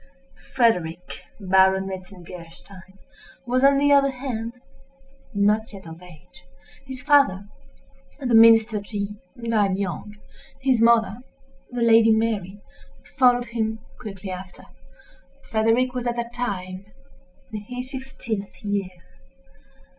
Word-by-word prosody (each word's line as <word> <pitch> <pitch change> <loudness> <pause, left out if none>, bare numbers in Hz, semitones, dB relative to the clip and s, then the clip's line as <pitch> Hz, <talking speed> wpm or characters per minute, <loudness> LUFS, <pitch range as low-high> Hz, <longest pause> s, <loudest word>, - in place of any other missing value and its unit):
Frederick, 180 -8 0
Baron 190 0 +3
Metzengerstein, 185 0 -11 0.5
was, 255 +2 0
on 275 0 +6
the 285 +1 +3
other 280 -1 +5
hand, 250 -4 -5 0.8
not 210 +1 +1
yet 195 -2 -11
of 165 +1 -10
age. 180 +1 -16 0.4
His 260 -1 -8
father, 275 -10 +4 0.7
the 250 -4 -1
Minister 225 -1 +6
G—, 205 0 -5 0.2
died 215 -5 +1
young. 200 +2 -4 0.4
His 260 -4 +2
mother, 230 -2 +4 0.5
the 245 -1 -2
Lady 225 -1 +6
Mary, 210 -3 -1 0.6
followed 245 -2 +3
him 220 -1 -1 0.2
quickly 195 -5 -7
after. 185 0 -9 0.8
Frederick 225 +3 +1
was, 250 -1 -3
at 240 - -1
that 235 0 -4
time, 195 -5 -4 0.7
in 210 - -4
his 250 +4 -7
fifteenth 240 -7 -6
year. 200 -2 -1
220 Hz, 110 wpm, -23 LUFS, 190-245 Hz, 0.8 s, on